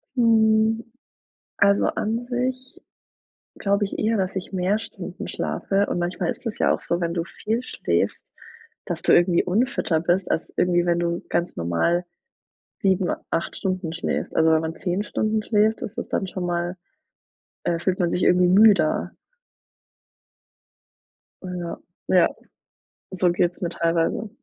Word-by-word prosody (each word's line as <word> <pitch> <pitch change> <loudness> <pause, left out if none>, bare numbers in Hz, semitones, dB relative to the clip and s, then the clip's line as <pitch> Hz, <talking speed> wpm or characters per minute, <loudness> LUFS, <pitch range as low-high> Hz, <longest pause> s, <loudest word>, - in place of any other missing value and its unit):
Hm. 220 -1 +3 0.8
Also, 200 0 +4
an 230 +3 -2
sich 255 +1 -3 0.8
glaube 200 +1 +1
ich 195 - -5
eher, 220 +1 +1
dass 190 -2 -1
ich 190 0 -5
mehr 190 +3 +1
Stunden - - -7
schlafe 200 +1 -1
und - - -2
manchmal 175 0 -1
ist - - -9
es 220 - -3
ja - - +3
auch - - -2
so, 170 - -2
wenn 170 -1 -1
du 170 - 0
viel 225 +7 -3
schläfst, - - -1 0.7
dass 175 -3 -4
du - - +3
irgendwie 175 0 +4
unfitter 190 -4 +1
bist 175 +3 +1
als - - -1
irgendwie, 175 -1 +2
wenn 170 0 +2
du 170 0 -1
ganz 175 - -1
normal 85 - +1 0.8
7, 190 -2 +2 0.2
8 165 - -2
Stunden 185 -4 -2
schläfst. 165 - -3
Also, 160 0 +4
wenn 160 0 +4
man 160 0 -4
10 185 +2 -1
Stunden 215 +1 -1
schläft, 215 0 +2
ist - - -6
das - - -4
dann 195 - -1
schon 180 -1 -4
mal, 175 +1 -2 0.9
äh 170 -1 0
fühlt 185 +1 0
man 175 -3 +1
sich 180 - 0
irgendwie 180 0 +4
müder. 195 -4 +4 2.3
Ja. 180 -2 -5 0.3
Ja, 180 -2 +5 0.8
so 180 -2 +2
geht's 175 0 0
mir 175 - -1
teilweise. 170 +5 0
180 Hz, 150 wpm, -23 LUFS, 175-210 Hz, 2.3 s, Ja